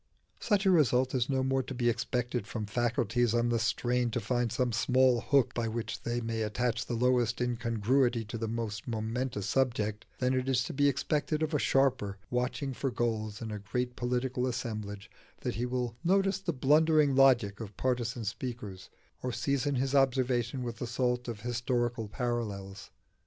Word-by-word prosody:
Such 205 -3 +1
a 190 - +6
result 130 -6 +3
is 125 -1 0
no 135 -1 +1
more 135 0 +1
to 130 +1 -7
be 120 -1 0
expected 120 -1 -1
from 110 -1 -4
faculties 120 +1 +1
on 120 0 +2
the 120 -1 +1
strain 120 +2 +1
to 115 - -1
find 120 +1 0
some 120 +1 0
small 125 +1 +3
hook 140 -2 +2
by 120 -1 -1
which 115 0 -4
they 120 0 -1
may 115 -1 -2
attach 115 +2 -1
the 120 - -2
lowest 125 -1 +2
incongruity 120 0 +1
to 115 +2 -5
the 115 - -2
most 110 -2 -4
momentous 115 -1 -2
subject, 110 -3 0
than 125 0 +1
it 130 0 0
is 125 -2 +2
to - - -5
be 145 +1 +4
expected 150 +3 0
of 155 +1 -2
a 150 - +2
sharper, 130 -9 +1
watching 125 +2 -1
for 135 +2 -2
gulls 110 -2 -2
in 110 - -5
a 105 - -4
great 125 +4 -3
political 125 +1 -1
assemblage, 110 -5 -4 0.3
that - - -2
he 120 +4 -2
will 125 -2 -2
notice 195 +3 +2
the 190 -2 -2
blundering 150 +1 +4
logic 125 -7 +4
of 105 -3 -8
partisan 120 -2 -1
speakers, 105 -4 -5 0.3
or 125 - -2
season 140 +2 0
his 135 +1 0
observation 130 -2 +2
with 120 -2 -5
the 125 - -4
salt 125 0 -1
of 115 -3 -5
historical 120 -1 -1
parallels. 105 -4 -4
120 Hz, 180 wpm, -30 LUFS, 115-130 Hz, 0.3 s, a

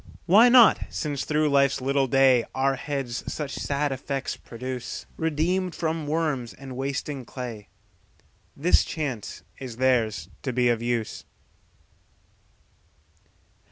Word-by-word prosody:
Why 215 +7 +7
not 240 -3 +7
since 145 -3 -3
through 155 0 +1
life's 140 -1 +3
little 135 +1 +1
dayOur 135 +1 +3
heads 135 -3 -4
such 150 -3 -4
sad 145 0 -1
effects 135 +1 -3
produce? 125 0 -6
Redeemed 170 +3 0
from 160 -2 -2
worms 150 -6 -1
and 135 -2 -9
wasting 135 +1 -3
clay, 120 -4 -7 0.9
This 165 +6 +4
chance 135 -9 -5 0.2
is 125 -4 -7
theirs 125 -4 +1
to 130 - -2
be 125 0 +2
of 115 -1 +1
use. 120 -2 -2
135 Hz, 115 wpm, -25 LUFS, 125-150 Hz, 0.9 s, Why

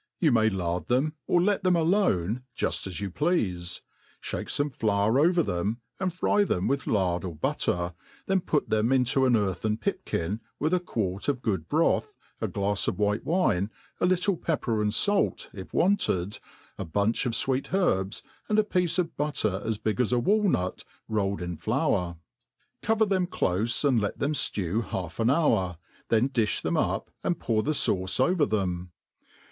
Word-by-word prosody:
You 160 -5 +3
may 110 -2 +4
lard 90 -3 -2
them<^ 135 +5 +1
let 190 +3 +2
them 185 -1 +4
alone, 160 - +1 0.2
juft - - 0
as 95 +1 -5
you 100 -2 -3
pleafe, 90 - -1 0.4
{hake - - -4
fome 145 -1 -1
flour 110 +2 +2
over 170 +3 +4
them, 100 +5 -2 0.2
and 185 -1 0
fry 195 +4 +2
them 90 - 0
wijth 140 +1 -1
lard 90 -5 +1
or 90 -4 -5
butter, 85 +3 -1 0.3
then 190 -1 +1
put 150 -3 -1
them 110 +3 +2
into 130 0 +3
an 125 - +3
earthea 105 0 0
pipkin, 95 +7 -2 0.2
with 155 +4 0
a 180 - +4
quart 100 - -3
of 135 -3 -1
good 95 -8 -1
broth, - - +1 0.3
a - - 0
glafs 100 0 -1
of - - -1
white 105 +1 0
wine, 155 - +1 0.3
a - - +3
little 185 +1 +2
pepper 120 -11 -1
and 105 0 0
fair, 205 - +3 0.2
if 95 -2 -9
wanted, 105 - +1 0.4
a - - -2
bunch 100 +9 0
of 120 - -1
fweet*herbs, 130 - 0 0.3
and 210 - +2
a 215 - +5
piece 180 -4 0
of 175 -2 -1
butter 110 -10 -1
as 110 -1 -1
big 110 +1 -1
as 125 - 0
a 125 - +3
walnut, 185 - +1 0.2
rolled 100 -3 -1
in 90 -2 -4
flour; 95 - 0 0.6
cover 220 0 +2
them 190 -3 +1
clofe, 115 - 0
and 125 -5 +3
let 100 - -2
them 145 +2 0
ftew 105 - 0
half 90 -3 -5
an 115 +1 +3
hour,, 110 - +2 0.3
then 115 +2 +3
dilh 115 -6 +1
tbem - - 0
up, - - -1
and 175 - 0
pour 110 -2 +1
the 155 +7 0
fauce 95 -8 +1
over 155 +3 +3
them. 90 -4 -2
115 Hz, 175 wpm, -27 LUFS, 95-160 Hz, 0.6 s, a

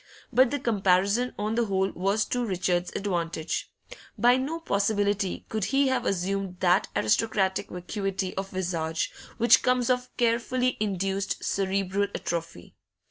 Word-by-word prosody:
But 260 0 +5
the 285 - -1
comparison, 200 +2 +2
on 210 +1 -1
the 235 0 +1
whole, 195 -1 0
was 195 +4 0
to 245 0 0
Richard's 180 -4 0
advantage. 170 -5 -2 0.5
By 245 +1 +5
no 280 +6 -2
possibility 205 - 0
could 220 -3 -2
he 275 0 +2
have 255 -2 0
assumed 195 0 -2
that 180 +1 +3
aristocratic 190 - +1
vacuity 190 +1 -3
of 195 0 -3
visage 165 -4 -2 0.3
which 235 +1 +6
comes 250 -1 +2
of 250 0 -1
carefully 245 +2 +1
induced 195 -1 -1
cerebral 195 +1 0
atrophy. 165 - -5
195 Hz, 135 wpm, -27 LUFS, 185-235 Hz, 0.5 s, which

